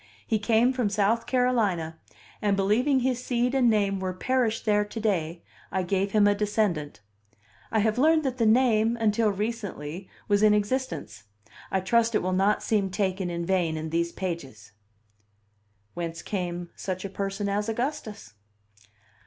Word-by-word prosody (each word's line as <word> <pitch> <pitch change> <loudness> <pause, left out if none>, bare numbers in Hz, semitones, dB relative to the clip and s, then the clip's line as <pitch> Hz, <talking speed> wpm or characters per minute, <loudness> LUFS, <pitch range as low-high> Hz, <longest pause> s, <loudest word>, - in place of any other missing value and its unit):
He 220 - 0
came 230 +4 +3
from 245 -5 0
South 215 +3 +1
Carolina; 205 -11 0 0.4
and 205 -2 +1
believing 245 +8 +2
his 250 -1 -1
seed 245 0 0
and 255 -3 +4
name 200 -3 +1
were 185 -1 -3
perished 245 +1 0
there 210 -1 +3
to 210 +2 -7
day, 170 -6 -1 0.3
I 190 - 0
gave 195 +2 0
him 210 -1 +4
a 205 - +5
descendant. 205 - -1 0.7
I 220 - +2
have 220 +2 +1
learned 315 +2 +4
that 260 -2 -2
the 225 - +3
name, 230 -1 +3
until 220 0 +2
recently, 200 -5 -4 0.2
was 205 -1 +2
in 210 -1 +5
existence; 200 - -3 0.4
I 190 - 0
trust 230 +4 +2
it - - +1
will 185 0 0
not 195 +3 +2
seem 205 -3 +1
taken 190 -1 -1
in 170 0 -3
vain 175 -4 0
in 155 0 -5
these 170 +1 0
pages. 140 - -6 1.2
Whence 165 -1 -5
came 175 -3 -4
such 185 0 -4
a - - -1
person 195 +1 -3
as 205 +2 -1
Augustus? 220 - -4
205 Hz, 160 wpm, -26 LUFS, 185-230 Hz, 1.2 s, a